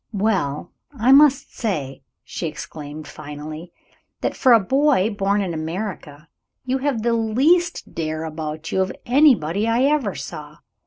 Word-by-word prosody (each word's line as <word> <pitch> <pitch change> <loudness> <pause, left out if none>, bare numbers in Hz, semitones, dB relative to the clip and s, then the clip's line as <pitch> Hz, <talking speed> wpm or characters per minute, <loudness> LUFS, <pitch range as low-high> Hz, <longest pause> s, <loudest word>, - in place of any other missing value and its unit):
"Well, 190 -8 -1 0.3
I 240 +3 +3
must 280 0 +5
say," 150 - -3 0.2
she - - -5
exclaimed, 150 0 -8
finally, 155 +3 -9 0.5
"that, - - -1
for 260 - +3
a 230 - +8
boy 260 -1 +2
born 200 0 0
in 180 -3 -3
America, 160 -2 -5 0.4
you 260 +1 0
have 260 -5 -1
the 235 0 +2
least 275 +11 +1
dare 155 -1 -3
about 155 0 -5
you 190 - +1
of 190 - -1
anybody 235 - +3
I 230 +3 +2
ever 275 - +1
saw. 150 +2 -8
195 Hz, 145 wpm, -21 LUFS, 155-250 Hz, 0.5 s, a